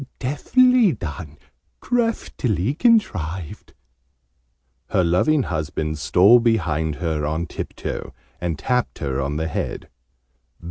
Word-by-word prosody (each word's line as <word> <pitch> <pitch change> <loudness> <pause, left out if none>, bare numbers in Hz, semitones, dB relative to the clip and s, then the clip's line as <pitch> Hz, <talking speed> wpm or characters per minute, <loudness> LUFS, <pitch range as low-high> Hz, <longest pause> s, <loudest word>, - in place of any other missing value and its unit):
Deftly 240 - +3
done! 75 - -7 0.4
Craftily 140 - -1
contrived!" 95 - 0 1.1
Her 95 -3 +1
loving 130 - +2
husband 80 -2 -3
stole 100 +10 +5
behind 80 -10 0
her 75 +1 -2
on 80 +3 -1
tiptoe, - - -6 0.3
and 85 -3 -2
tapped 125 - -1
her 70 -2 -2
on 70 +2 -2
the 80 +1 -1
head. 80 - -4
90 Hz, 100 wpm, -22 LUFS, -, 1.1 s, stole